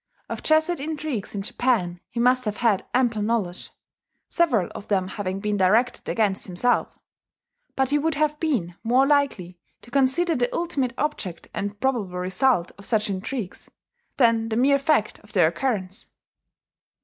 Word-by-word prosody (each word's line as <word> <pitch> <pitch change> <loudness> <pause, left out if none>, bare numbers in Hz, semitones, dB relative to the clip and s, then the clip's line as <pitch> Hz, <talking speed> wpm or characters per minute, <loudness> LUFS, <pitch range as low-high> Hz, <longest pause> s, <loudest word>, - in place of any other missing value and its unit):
Of - - -4
Jesuit 315 +2 +2
intrigues 295 -8 -4
in 200 - -3
Japan 195 -7 0
he 235 - -5
must 250 +1 +3
have 210 -1 -2
had 225 -5 +1
ample 240 -4 +1
knowledge 205 -5 -2 0.6
several 260 - +2
of 205 - -9
them 190 -2 0
having 195 -1 -4
been 210 0 -1
directed 215 +6 +2
against 205 -3 0
himself; 195 +7 0 0.8
but 265 0 +1
he 295 - +3
would 320 0 0
have 300 0 0
been 240 - -1
more 250 +4 +4
likely 270 -12 0 0.2
to 240 - -15
consider 280 +6 +2
the 245 -1 0
ultimate 280 -8 -1
object 220 - -3
and 205 0 -4
probable 220 -9 -1
result 185 +2 +1
of 200 - -8
such 215 -2 +1
intrigues, 195 +1 -5 0.5
than 230 -3 +3
the 220 - -1
mere 275 +4 +4
fact 275 -7 +1
of 210 0 -15
their 175 -6 +5
occurrence. 195 -1 -2
230 Hz, 155 wpm, -24 LUFS, 195-270 Hz, 0.8 s, their